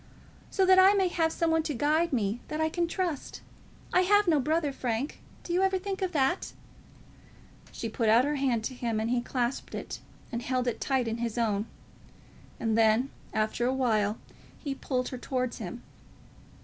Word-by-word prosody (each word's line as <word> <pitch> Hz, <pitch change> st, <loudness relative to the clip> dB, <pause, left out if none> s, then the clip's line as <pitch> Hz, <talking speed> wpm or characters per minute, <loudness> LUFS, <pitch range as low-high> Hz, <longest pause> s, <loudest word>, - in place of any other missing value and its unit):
"So 385 Hz, -, +2 dB
that 375 Hz, 0 st, +7 dB
I 385 Hz, +2 st, +7 dB
may 380 Hz, -2 st, +3 dB
have 325 Hz, -2 st, +1 dB
some 330 Hz, 0 st, 0 dB
one 320 Hz, 0 st, +3 dB
to 305 Hz, -2 st, -3 dB
guide 310 Hz, +6 st, +2 dB
me 220 Hz, -3 st, 0 dB
that 305 Hz, -, -4 dB
I 315 Hz, 0 st, +2 dB
can 340 Hz, +1 st, 0 dB
trust. 340 Hz, -5 st, -3 dB, 0.5 s
I 365 Hz, -, +5 dB
have 410 Hz, +2 st, +4 dB
no 315 Hz, -4 st, +4 dB
brother, 300 Hz, +1 st, 0 dB
Frank; 245 Hz, +2 st, -3 dB, 0.2 s
do 345 Hz, -, -4 dB
you 360 Hz, -, +3 dB
ever 385 Hz, 0 st, +3 dB
think 385 Hz, +1 st, -4 dB
of 375 Hz, -1 st, 0 dB
that?" 295 Hz, +3 st, 0 dB, 1.2 s
She 230 Hz, -, -5 dB
put 225 Hz, 0 st, 0 dB
out 235 Hz, +4 st, +6 dB
her 295 Hz, 0 st, 0 dB
hand 255 Hz, -5 st, +1 dB
to 260 Hz, -, -3 dB
him, 235 Hz, -3 st, -2 dB
and 225 Hz, +2 st, -1 dB
he 245 Hz, -1 st, +2 dB
clasped 245 Hz, +1 st, -2 dB
it, -, -, -6 dB, 0.3 s
and 235 Hz, -1 st, -3 dB
held 255 Hz, 0 st, -1 dB
it 240 Hz, -, -2 dB
tight 265 Hz, -3 st, +1 dB
in 225 Hz, 0 st, -2 dB
his 235 Hz, -1 st, -3 dB
own; 215 Hz, -2 st, 0 dB, 0.9 s
and 225 Hz, -1 st, 0 dB
then, 225 Hz, +4 st, +3 dB, 0.2 s
after 220 Hz, +2 st, 0 dB
a 260 Hz, -, +1 dB
while, 220 Hz, -5 st, +1 dB, 0.4 s
he 280 Hz, -3 st, -4 dB
pulled 255 Hz, -2 st, -2 dB
her 255 Hz, -, -6 dB
towards 255 Hz, -1 st, -2 dB
him. 225 Hz, +3 st, -6 dB
265 Hz, 190 wpm, -29 LUFS, 235-330 Hz, 1.2 s, that